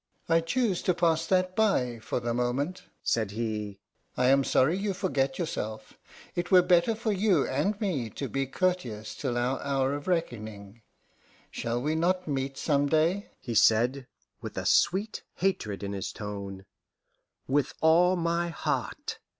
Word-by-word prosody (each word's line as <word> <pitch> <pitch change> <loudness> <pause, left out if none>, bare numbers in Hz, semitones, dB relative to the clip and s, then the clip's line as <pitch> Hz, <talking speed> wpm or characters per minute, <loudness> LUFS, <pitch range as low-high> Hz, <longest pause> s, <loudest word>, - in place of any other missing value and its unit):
"I 165 0 +4
choose 200 +2 0
to 180 - +1
pass 165 -1 +2
that 185 -1 +1
by, 130 - +1
for 110 - -3
the 120 -1 -2
moment," 125 +9 -1 0.2
said 110 -3 +1
he. 105 -2 -3 0.4
"I 125 0 +3
am 135 0 +5
sorry 135 +5 +3
you 195 0 -2
forget 140 -9 0
yourself; 110 -10 -4 0.4
it 175 0 -2
were 185 -2 +7
better 180 +5 +3
for 220 0 -1
you 195 -6 +2
and 195 +10 0
me 160 - -1
to 135 - -5
be 135 +1 -2
courteous 130 - -1
till 125 -4 -3
our 125 +2 0
hour 135 -1 0
of 145 +3 -5
reckoning, 110 - -3 0.7
Shall 120 +1 -2
we 150 +2 0
not 180 +3 +1
meet 135 -1 -2
some 145 -2 +1
day?" 165 +6 +1
he 120 - -5
said, 120 +5 +3 0.3
with - - -7
a - - -3
sweet 200 +4 +2
hatred 110 - -1
in 100 0 -3
his 95 -2 -4
tone. 100 -2 -7 0.8
"With 140 +1 0
all 175 +3 +5
my 170 0 0
heart." 165 - -3
145 Hz, 160 wpm, -28 LUFS, 120-180 Hz, 0.8 s, were